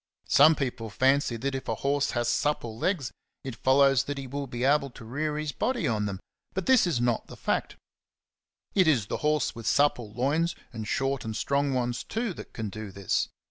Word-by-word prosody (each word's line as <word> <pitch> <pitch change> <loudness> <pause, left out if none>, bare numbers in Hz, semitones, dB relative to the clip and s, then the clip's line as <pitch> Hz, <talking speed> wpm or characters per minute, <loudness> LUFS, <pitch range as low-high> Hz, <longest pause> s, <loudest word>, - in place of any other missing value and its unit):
Some 155 +3 +7
people 125 -5 -3
fancy 130 +2 +2
that 135 +4 -2
if 135 - -5
a - - 0
horse 140 +1 0
has 120 0 +1
supple 120 -3 0
legs, 145 - -1 0.3
it 130 -3 -5
follows 135 +1 +4
that 145 0 -4
he 135 - -5
will 140 +2 -4
be 120 0 -4
able 140 +1 +3
to 115 -2 -12
rear 150 +5 -2
his 155 -1 -2
body 245 - -1
on 105 -2 0
them; 95 -2 -4 0.4
but 190 -1 -2
this 260 -7 +5
is 160 -9 0
not 120 -2 0
the - - -11
fact. - - -1 1.0
It 185 -4 +4
is 130 -10 +3
the - - -3
horse 150 -2 +1
with 115 -1 -7
supple 125 -7 +2
loins, 145 +9 0 0.2
and 110 -2 -5
short 135 +2 -1
and 110 -1 -4
strong 140 0 +1
ones 120 -1 -1
too, 225 -2 -2
that - - -10
can 110 -3 -4
do 110 +1 -7
this. 100 0 -1
135 Hz, 205 wpm, -28 LUFS, 115-150 Hz, 1.0 s, Some